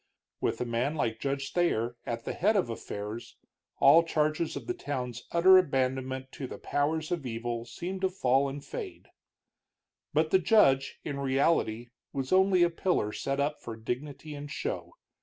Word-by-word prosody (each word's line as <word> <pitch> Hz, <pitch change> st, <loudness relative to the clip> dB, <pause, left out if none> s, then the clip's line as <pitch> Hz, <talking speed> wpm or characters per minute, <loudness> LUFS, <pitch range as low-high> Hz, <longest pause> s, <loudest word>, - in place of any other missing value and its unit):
With -, -, -1 dB
a -, -, -1 dB
man 120 Hz, +6 st, -1 dB
like 115 Hz, -7 st, -1 dB
Judge 140 Hz, 0 st, -3 dB
Thayer 120 Hz, -10 st, +1 dB
at 115 Hz, -1 st, -3 dB
the -, -, -2 dB
head 210 Hz, +5 st, +2 dB
of 185 Hz, -, +1 dB
affairs, 105 Hz, 0 st, -6 dB, 0.4 s
all 140 Hz, +5 st, +7 dB
charges 155 Hz, 0 st, 0 dB
of -, -, -6 dB
the 360 Hz, -, -1 dB
town's 125 Hz, -, -5 dB
utter 185 Hz, +2 st, +7 dB
abandonment 130 Hz, -3 st, -1 dB
to 135 Hz, -, -6 dB
the -, -, -8 dB
powers 155 Hz, +3 st, -1 dB
of 170 Hz, -4 st, -1 dB
evil 120 Hz, -1 st, -3 dB
seemed 175 Hz, +11 st, -5 dB
to 190 Hz, -, +2 dB
fall 135 Hz, -6 st, +2 dB
and 140 Hz, +1 st, -7 dB
fade. 415 Hz, -6 st, -7 dB, 1.0 s
But -, -, +1 dB
the 380 Hz, -, +6 dB
judge, 135 Hz, -, +4 dB
in 140 Hz, -2 st, -4 dB
reality, 130 Hz, -4 st, +1 dB, 0.2 s
was 135 Hz, -2 st, -3 dB
only 190 Hz, -1 st, +5 dB
a 175 Hz, -, +3 dB
pillar 170 Hz, -, 0 dB
set 140 Hz, 0 st, -2 dB
up 145 Hz, +1 st, -1 dB
for 115 Hz, -, -6 dB
dignity 140 Hz, +7 st, -5 dB
and 145 Hz, 0 st, -7 dB
show. 450 Hz, -, -4 dB
140 Hz, 170 wpm, -29 LUFS, 125-170 Hz, 1.0 s, all